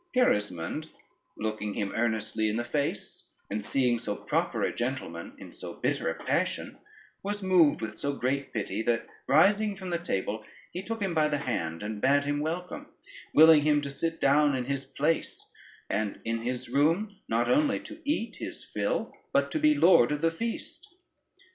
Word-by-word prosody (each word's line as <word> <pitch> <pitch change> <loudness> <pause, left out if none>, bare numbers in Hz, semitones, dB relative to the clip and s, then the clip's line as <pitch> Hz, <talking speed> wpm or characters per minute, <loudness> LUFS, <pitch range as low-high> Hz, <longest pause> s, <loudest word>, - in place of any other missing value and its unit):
Gerismond, 105 - +1 0.5
looking 105 -1 -3
him 100 -2 -2
earnestly 110 -1 0
in 105 - -1
the 120 - -1
face, 140 +4 -3 0.2
and 105 +1 -2
seeing 120 +1 +1
so 105 -3 -3
proper - - -1
a - - 0
gentleman 120 -10 -4
in - - -11
so - - -8
bitter - - -1
a - - -2
passion, - - -1 0.4
was 205 0 -3
moved 175 -10 +4
with 110 0 -3
so 140 +5 -2
great 135 +2 -1
pity, 105 -1 -2
that 115 0 0 0.2
rising 205 +7 +4
from 190 -2 -6
the 170 - 0
table, 110 - -2 0.3
he 180 - -4
took 225 +1 -4
him 190 -3 -1
by 155 -2 +3
the 150 -1 0
hand 100 - -3
and 105 0 -4
bad 140 +2 +3
him 145 0 0
welcome, 170 +4 -4 0.5
willing 160 0 +8
him 150 0 +3
to 140 - -4
sit 165 +4 -2
down 145 0 +4
in 125 -1 -2
his 135 0 -2
place, 150 +4 -2 0.4
and 105 -1 -2
in 115 0 -1
his 125 +1 -3
room 165 - +1
not 115 +1 +1
only 285 +1 +3
to 310 +1 -11
eat 235 -7 -1
his - - -6
fill, - - -2 0.2
but - - +2
be 305 0 +5
lord 175 - +6
of 150 +1 -2
the 165 - +4
feast. 230 - -6
140 Hz, 175 wpm, -28 LUFS, 115-175 Hz, 0.5 s, willing